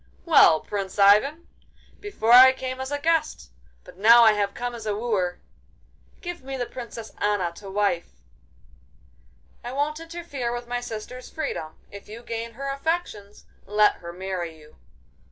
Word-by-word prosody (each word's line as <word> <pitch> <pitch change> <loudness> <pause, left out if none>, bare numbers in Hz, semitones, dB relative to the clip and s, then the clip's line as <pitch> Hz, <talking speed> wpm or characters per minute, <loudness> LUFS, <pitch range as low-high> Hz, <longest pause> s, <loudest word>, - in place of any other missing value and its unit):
'Well, 225 - +6
Prince 195 -2 -5
Ivan! 215 +12 +4 0.5
Before 400 - -2
I 260 +2 +9
came 260 0 -5
as 265 - -5
a 290 - -1
guest, 295 - -1 0.3
but - - -15
now 230 +4 +7
I 220 - +7
have 205 -1 -1
come 245 0 -4
as 225 -2 -8
a 210 - -1
wooer! 205 -6 -2 0.8
Give 350 -3 -6
me 270 0 -5
the 245 - -2
Princess 230 -2 -9
Anna 205 -4 0
to 200 -2 -10
wife.' 200 -3 -2 1.4
'I 245 - -6
won't 295 +3 -1
interfere 330 -7 -5
with 240 0 -6
my 245 0 -3
sister's 245 +2 -8
freedom. 220 - -5
If 200 0 -12
you 230 +3 -10
gain 230 0 -5
her 275 +4 -6
affections, 275 -9 -4 0.2
let 210 +1 +3
her 170 0 -9
marry 180 -2 -5
you. 150 0 -19
230 Hz, 155 wpm, -24 LUFS, 200-265 Hz, 1.4 s, I